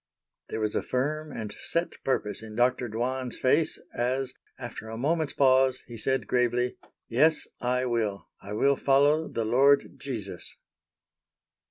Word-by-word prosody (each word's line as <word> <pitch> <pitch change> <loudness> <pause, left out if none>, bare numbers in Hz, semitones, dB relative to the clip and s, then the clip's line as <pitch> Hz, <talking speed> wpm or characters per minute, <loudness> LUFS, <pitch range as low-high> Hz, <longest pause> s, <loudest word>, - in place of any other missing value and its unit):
There - - -3
was 105 -1 0
a - - 0
firm 150 +4 -2
and 110 -3 -5
set 170 +1 -2
purpose 120 -6 -1
in 110 -1 -9
Dr. 125 0 +2
Dwan's 125 +3 -2
face 145 +5 +2
as, 130 +2 -1 0.2
after 120 -3 -7
a 110 - -6
moment's 155 +4 0
pause, 130 -1 +3
he 120 - -10
said 130 +4 0
gravely: 125 0 +1 0.3
"Yes, 150 +6 +3
I 125 +1 0
will, 110 -5 -1
I 100 +1 -7
will 140 +6 +3
follow 145 +3 +3
the 115 - -2
Lord 135 +5 +3
Jesus." 115 -8 -6
125 Hz, 145 wpm, -28 LUFS, 115-140 Hz, 0.3 s, pause